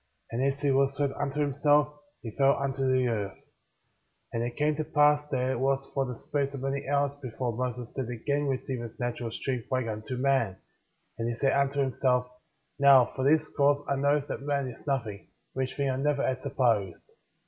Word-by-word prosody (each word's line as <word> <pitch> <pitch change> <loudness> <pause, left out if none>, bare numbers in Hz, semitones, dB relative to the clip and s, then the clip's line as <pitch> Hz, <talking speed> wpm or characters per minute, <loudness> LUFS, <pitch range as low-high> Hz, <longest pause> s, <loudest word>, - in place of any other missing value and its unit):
And 120 +3 -1
as 140 +1 0
he 145 -2 +2
was 135 +1 +2
left 140 -2 +1
unto 145 +1 -2
himself, 145 +1 +3 0.3
he 115 - -5
fell 140 0 +4
unto 135 -1 0
the 130 -1 +3
earth. 105 -4 -2 1.0
10. 115 - -2
And - - 0
it 120 0 -4
came 150 0 +2
to 155 - 0
pass 150 -1 +4
that 130 -2 0
it 125 - -2
was 135 +1 +1
for 135 -1 0
the 125 - -5
space 140 +3 -2
of 135 - -6
many 135 0 -2
hours 140 0 +2
before 125 -2 -3
Moses 125 -1 -3
did 130 -3 -4
again 140 +5 -1
receive 130 -2 -2
his 115 -2 -9
natural 120 -1 -2
strength 125 +1 -3
like 130 -1 0
unto 110 +3 -4
man; 130 -7 +1 0.6
and 115 +1 -1
he 120 - -2
said 135 +3 +2
unto 140 0 +1
himself: 125 -1 +1 0.5
Now, 135 -3 +6
for 130 - -2
this 155 +3 +3
cause 145 0 +3
I 140 - +1
know 140 +2 +2
that 140 - -6
man 140 -1 -1
is 125 - -13
nothing,^ 115 -7 -2 0.3
which 130 0 -3
thing 140 -1 +1
I 130 - -2
never 140 +1 +1
had 130 0 -1
supposed. 115 - 0
135 Hz, 205 wpm, -28 LUFS, 125-140 Hz, 1.0 s, Now